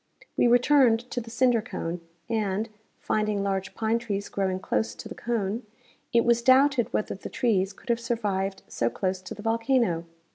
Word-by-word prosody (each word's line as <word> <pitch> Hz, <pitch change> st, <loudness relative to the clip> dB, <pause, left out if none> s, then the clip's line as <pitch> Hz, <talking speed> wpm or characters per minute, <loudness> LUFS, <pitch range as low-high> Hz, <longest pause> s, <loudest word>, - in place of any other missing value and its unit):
We -, -, +4 dB
returned 245 Hz, -1 st, +5 dB
to 245 Hz, -, -2 dB
the 230 Hz, -, -10 dB
cinder 245 Hz, -1 st, +3 dB
cone 180 Hz, -6 st, -5 dB, 0.3 s
and, 215 Hz, -1 st, -1 dB, 0.3 s
finding 210 Hz, -2 st, 0 dB
large 195 Hz, -1 st, -2 dB
pine 225 Hz, +1 st, +1 dB
trees 205 Hz, -4 st, -3 dB
growing 190 Hz, -1 st, -1 dB
close 220 Hz, -, -1 dB
to -, -, -8 dB
the 230 Hz, -, -7 dB
cone, 225 Hz, -2 st, -2 dB, 0.5 s
it 235 Hz, 0 st, +3 dB
was 235 Hz, 0 st, +4 dB
doubted 260 Hz, 0 st, +4 dB
whether 215 Hz, -, -1 dB
the 195 Hz, -, -8 dB
trees 195 Hz, -5 st, +1 dB
could 210 Hz, -, -17 dB
have 235 Hz, 0 st, +2 dB
survived 200 Hz, -5 st, -2 dB
so 115 Hz, -, 0 dB
close 185 Hz, +8 st, -2 dB
to 185 Hz, -, -8 dB
the 210 Hz, -, -10 dB
volcano. 225 Hz, -6 st, +1 dB
220 Hz, 175 wpm, -27 LUFS, 195-235 Hz, 0.5 s, returned